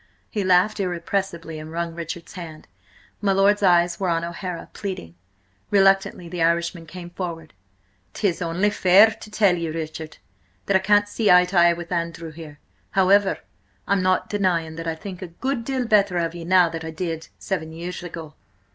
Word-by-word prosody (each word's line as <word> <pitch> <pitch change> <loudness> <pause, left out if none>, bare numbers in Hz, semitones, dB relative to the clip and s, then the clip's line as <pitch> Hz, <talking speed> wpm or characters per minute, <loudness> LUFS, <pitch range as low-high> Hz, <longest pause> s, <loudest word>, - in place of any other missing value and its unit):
He 210 -3 -1
laughed 185 +4 +3
irrepressibly, 175 -2 -3
and 155 +1 -9
wrung 170 0 -3
Richard's 170 0 -7
hand. 165 -4 -9 0.5
My 200 -2 +2
lord's 200 +2 +3
eyes 175 -2 +3
were 190 -2 0
on 165 0 0
O'Hara, 170 0 -5
pleading. 185 - -6 0.6
Reluctantly 195 -3 +3
the 175 0 -5
Irishman 170 0 0
came 175 +1 -9
forward. 170 -3 -6 0.6
"'Tis 190 -5 0
only 175 +5 +1
fair 200 +3 +6
to 215 - -11
tell 205 -4 +3
you, 165 -2 -3
Richard, 160 -1 -6 0.5
that 200 - +1
I - - +6
can't 205 +2 +3
see 210 +1 0
eye 180 0 +7
to 180 +2 -7
eye 170 0 +6
with 170 0 -8
Andrew, 170 -1 -3
here. 155 -2 -11 0.3
However, 195 0 +3 0.5
I'm 200 0 +2
not 185 0 +1
denying 175 -6 0
that 165 0 -5
I 165 - -1
think 180 +2 -8
a 185 - -5
good 245 +9 -3
deal 260 0 -2
better 200 -5 +3
of 165 -1 -1
ye 170 -1 -7
now 180 0 +5
than 165 0 -6
I 160 - -5
did–seven 160 +1 -4
years 170 +2 -6
ago." 165 -3 -8
175 Hz, 175 wpm, -23 LUFS, 165-195 Hz, 0.6 s, eye